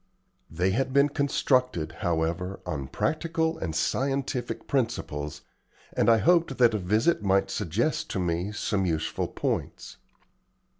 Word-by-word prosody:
They 90 +4 0
had 130 +5 0
been 140 +1 +5
constructed, 130 - +1
however, 85 +1 -1
on 75 -7 -3
practical 160 - -1
and 80 - -3
scientific 135 - -1
principles, 75 - -2 0.5
and - - +2
I 115 - +6
hoped 170 +2 +3
that 120 -3 +5
a 105 - 0
visit 110 - +2
might 95 -1 +2
suggest 105 - -1
to - - -2
me 90 +2 -1
some 105 -2 -1
useful 80 -2 -1
points. - - -3
105 Hz, 130 wpm, -27 LUFS, 85-135 Hz, 0.5 s, I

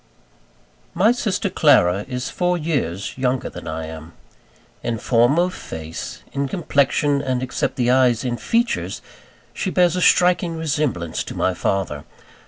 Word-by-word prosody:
My 215 +5 +4
sister 225 -4 -1
Clara 105 - +3
is 125 -1 -4
four 180 0 0
years 135 - -2
younger 130 0 -1
than - - -9
I 80 0 -4
am. 80 +1 -9 0.7
In 115 -1 -2
form 120 +6 +3
of 180 +1 +2
face, 80 - -7
in 140 0 -1
complexion, 145 -2 +1
and 130 -2 -1
except 130 - -2
the 125 -1 +2
eyes 125 -2 +3
in 120 -1 -1
features, 235 - -1 0.5
she 190 - -2
bears 180 -2 +3
a 180 - -1
striking 180 -2 +3
resemblance 145 - -1
to - - -7
my 95 - +1
father. 90 -4 -2
130 Hz, 145 wpm, -21 LUFS, -, 0.7 s, My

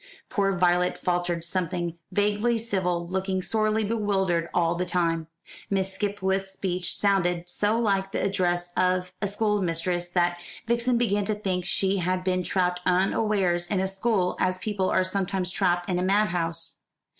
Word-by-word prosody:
Poor 195 -2 +1
Violet 180 0 +2
faltered 175 -2 -1
something 175 -1 -1 0.2
vaguely 210 +3 +1
civil, 185 -6 -1
looking 190 0 -1
sorely 215 +1 +1
bewildered 195 -6 0
all 170 -1 +2
the 175 +1 -1
time. 165 -3 0 0.4
Miss 190 -1 0
Skipwith's 195 -1 -1
speech 185 -2 -2
sounded 180 -4 +1
so 205 +5 0
like 195 -4 +1
the - - -1
address 175 -2 0
of 180 0 +1
a 205 - +1
schoolmistress 180 -4 0
that 175 -1 +1 0.3
Vixen 235 +1 +1
began 205 -4 +1
to 215 +1 0
think 185 -4 -2
she 195 0 +1
had 185 0 -1
been 185 0 +1
trapped 180 0 0
unawares 185 -1 +1
in 190 +1 0
a 190 - +1
school, 195 -1 0
as 185 0 +1
people 190 -1 -1
are 185 - +3
sometimes 185 -1 -1
trapped 175 -1 +1
in 180 -2 0
a - - 0
madhouse. 175 -4 0
185 Hz, 155 wpm, -26 LUFS, 175-200 Hz, 0.4 s, are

